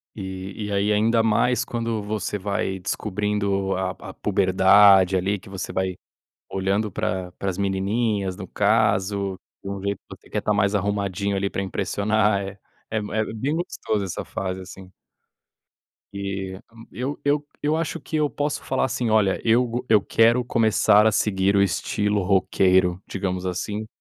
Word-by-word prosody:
E 95 Hz, +1 st, -6 dB
e, -, -, -5 dB
aí, 100 Hz, +2 st, +1 dB
ainda 110 Hz, +2 st, +3 dB
mais 120 Hz, +3 st, +2 dB
quando 115 Hz, -3 st, -3 dB
você 105 Hz, -1 st, -3 dB
vai 95 Hz, -1 st, -2 dB
descobrindo 100 Hz, 0 st, -1 dB
a 95 Hz, -1 st, -1 dB, 0.2 s
a -, -, -8 dB
puberdade, 95 Hz, 0 st, +5 dB
ali, 95 Hz, +2 st, 0 dB
que -, -, -17 dB
você 95 Hz, -1 st, -5 dB
vai 95 Hz, -1 st, -1 dB, 0.6 s
olhando 100 Hz, +3 st, 0 dB
pra 90 Hz, 0 st, -2 dB
pra 100 Hz, -, -3 dB
as 90 Hz, -, -6 dB
menininhas, 100 Hz, 0 st, 0 dB
no 95 Hz, -3 st, -8 dB
caso, 100 Hz, -2 st, +1 dB, 0.2 s
de -, -, -7 dB
um 100 Hz, -1 st, -5 dB
jeito 100 Hz, -1 st, -2 dB
que -, -, -12 dB
você -, -, -20 dB
quer -, -, -1 dB
tá 105 Hz, -, 0 dB
mais 100 Hz, 0 st, +2 dB
arrumadinho, 100 Hz, 0 st, -1 dB
ali, 100 Hz, 0 st, -1 dB
pra 95 Hz, -, -2 dB
impressionar 100 Hz, +2 st, +1 dB
é. 95 Hz, 0 st, -7 dB, 0.3 s
É 110 Hz, -, 0 dB
m 105 Hz, -1 st, -5 dB
é 110 Hz, 0 st, +1 dB
bem 135 Hz, +7 st, -1 dB
gostoso 110 Hz, -, -2 dB
essa 95 Hz, -, -4 dB
fase, 95 Hz, -1 st, -4 dB
assim. 95 Hz, 0 st, -11 dB, 1.2 s
Eh, 95 Hz, -1 st, -4 dB
hã, 115 Hz, -, -24 dB, 0.2 s
eu 130 Hz, +4 st, -4 dB
eu 145 Hz, +1 st, +1 dB, 0.2 s
eu 150 Hz, +2 st, +2 dB
acho 165 Hz, 0 st, -2 dB
que 155 Hz, -, -4 dB
eu 150 Hz, -1 st, +2 dB
posso 145 Hz, +1 st, -2 dB
falar, 130 Hz, -, 0 dB
assim: 120 Hz, -2 st, -1 dB
"Olha 105 Hz, -3 st, +3 dB
eu 115 Hz, +2 st, +4 dB
go 120 Hz, +1 st, -4 dB
eu 110 Hz, -2 st, +5 dB
quero 115 Hz, +4 st, +3 dB
começar 110 Hz, -2 st, +4 dB
a -, -, +4 dB
seguir 100 Hz, -1 st, +1 dB
o 100 Hz, -, +4 dB
estilo 100 Hz, +2 st, 0 dB
roqueiro", 95 Hz, -1 st, +2 dB
digamos, 95 Hz, -1 st, -3 dB
assim 105 Hz, +4 st, -3 dB
100 Hz, 170 wpm, -23 LUFS, 95-110 Hz, 1.2 s, puberdade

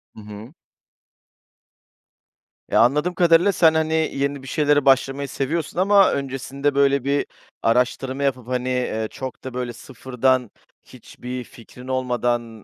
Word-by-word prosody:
Hı 110 Hz, -, -11 dB
hı. 105 Hz, +6 st, -11 dB, 2.2 s
Eee, -, -, +2 dB
anladığım 150 Hz, +9 st, +3 dB
kadarıyla 175 Hz, +2 st, +4 dB
sen, 165 Hz, -4 st, +4 dB
hani, 160 Hz, 0 st, 0 dB, 0.2 s
yeni 140 Hz, 0 st, -2 dB
bir -, -, -11 dB
şeylere 145 Hz, 0 st, +1 dB
başlamayı 135 Hz, +1 st, +2 dB
seviyorsun 155 Hz, +5 st, -3 dB
ama 200 Hz, +1 st, +5 dB
öncesinde, 140 Hz, +1 st, -3 dB
böyle, 140 Hz, -1 st, +3 dB
bir 140 Hz, +1 st, 0 dB, 0.4 s
araştırma 125 Hz, +3 st, 0 dB
yapıp, 130 Hz, -4 st, -1 dB
hani, 125 Hz, 0 st, -2 dB
eee, 125 Hz, -3 st, -2 dB
çok 130 Hz, -1 st, -8 dB
da, 130 Hz, -, -7 dB
böyle, 125 Hz, -1 st, -4 dB
sıfırdan, 130 Hz, -1 st, -1 dB, 0.3 s
hiçbir 125 Hz, 0 st, -9 dB
fikrin 125 Hz, +2 st, -14 dB
olmadan, 120 Hz, -3 st, -2 dB
130 Hz, 130 wpm, -22 LUFS, 125-145 Hz, 2.2 s, ama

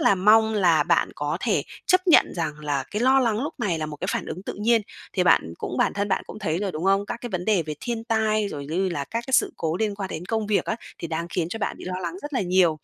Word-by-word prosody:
là -, -, +5 dB
mong 220 Hz, +3 st, +4 dB
là 175 Hz, -6 st, +4 dB
bạn -, -, +2 dB
có 145 Hz, +2 st, -2 dB
thể -, -, +1 dB, 0.2 s
chấp 370 Hz, +1 st, +3 dB
nhận 340 Hz, -, +6 dB
rằng 160 Hz, -3 st, -1 dB
là 145 Hz, -3 st, -1 dB
cái 210 Hz, -, -2 dB
lo 265 Hz, +2 st, +5 dB
lắng 230 Hz, -1 st, +1 dB
lúc 305 Hz, +3 st, -4 dB
này 185 Hz, -8 st, 0 dB
là 155 Hz, -, -2 dB
một 150 Hz, -, -7 dB
cái -, -, -4 dB
phản -, -, -2 dB
ứng 160 Hz, -, -5 dB
tự -, -, -4 dB
nhiên. 230 Hz, +1 st, +4 dB, 0.3 s
Thì 185 Hz, -, +1 dB
bạn 80 Hz, -, +4 dB
cũng 125 Hz, -, -4 dB
bản -, -, +2 dB
thân 200 Hz, 0 st, -1 dB
bạn 190 Hz, -, +1 dB
cũng -, -, -9 dB
thấy 170 Hz, -6 st, -1 dB
rồi, 195 Hz, -1 st, -2 dB
đúng 155 Hz, +3 st, -4 dB
không? 195 Hz, +1 st, +3 dB
Các 235 Hz, -, -4 dB
cái 240 Hz, -, -5 dB
vấn 180 Hz, -1 st, -3 dB
đề 200 Hz, -5 st, +2 dB
về 155 Hz, -1 st, -5 dB
thiên 230 Hz, -2 st, -3 dB
tai, 215 Hz, -2 st, +1 dB
rồi 140 Hz, -4 st, -6 dB
như 185 Hz, +5 st, 0 dB
là 145 Hz, -6 st, -3 dB
các 230 Hz, +6 st, -4 dB
cái 265 Hz, -, -6 dB
sự -, -, +4 dB
cố 160 Hz, 0 st, -1 dB
liên 210 Hz, 0 st, -1 dB
quan 200 Hz, -1 st, -4 dB
đến 160 Hz, +3 st, -5 dB
công 220 Hz, 0 st, -1 dB
việc 210 Hz, -1 st, +1 dB
á, 220 Hz, -, -2 dB, 0.2 s
thì 170 Hz, -, -5 dB
đang 165 Hz, +1 st, -2 dB
khiến 175 Hz, -1 st, -1 dB
cho 225 Hz, -, -5 dB
bạn -, -, -2 dB
bị -, -, -9 dB
lo 185 Hz, -, -4 dB
lắng 180 Hz, -, -3 dB
rất 295 Hz, -, -6 dB
là 260 Hz, -, +1 dB
nhiều. 180 Hz, -4 st, +3 dB
195 Hz, 300 wpm, -24 LUFS, 165-220 Hz, 0.3 s, nhận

